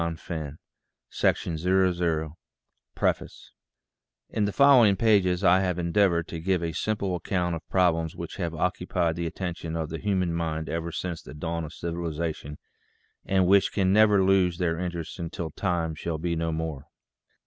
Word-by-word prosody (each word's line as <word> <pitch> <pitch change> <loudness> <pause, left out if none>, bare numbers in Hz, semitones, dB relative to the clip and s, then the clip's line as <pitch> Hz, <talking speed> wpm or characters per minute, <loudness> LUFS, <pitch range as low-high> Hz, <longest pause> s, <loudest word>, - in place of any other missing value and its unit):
VAN 80 -2 -4 0.5
NOSTRAND 80 - 0 0.3
COMPANY 80 -3 -1 0.6
PREFACE - - -2 0.8
IN 105 - +1
the 100 - -1
following 125 -6 +6
pages 95 -4 +3
I 95 -1 +6
have 90 -2 0
endeavored 85 -1 +2
to 85 - -5
give 90 +1 0
a 85 - -1
sim 110 +7 -1
ple 95 -3 -2
account 90 0 -1
of 80 - -10
problems 85 -3 +1
which - - -7
have 85 -1 -3
occupied 90 -1 0
the 85 0 -2
attention 85 -2 -5
of 80 -2 -3
the 80 0 -5
human 95 -4 0
mind 80 -1 -2
ever 85 0 -3
since 85 0 -4
the - - -11
dawn 85 +2 -3
of 75 - -10
civilization, 85 -3 -4 0.7
and 95 -1 +2
which 100 +1 +4
can 95 -2 +2
never 105 -2 +5
lose 95 -2 +3
their 85 -2 0
interest 85 -1 -5
until 85 -1 -4
time 85 -2 -1
shall 80 +1 -4
be 85 +1 -2
no 80 0 -1
more. 80 -3 -4
85 Hz, 160 wpm, -26 LUFS, 80-95 Hz, 0.8 s, following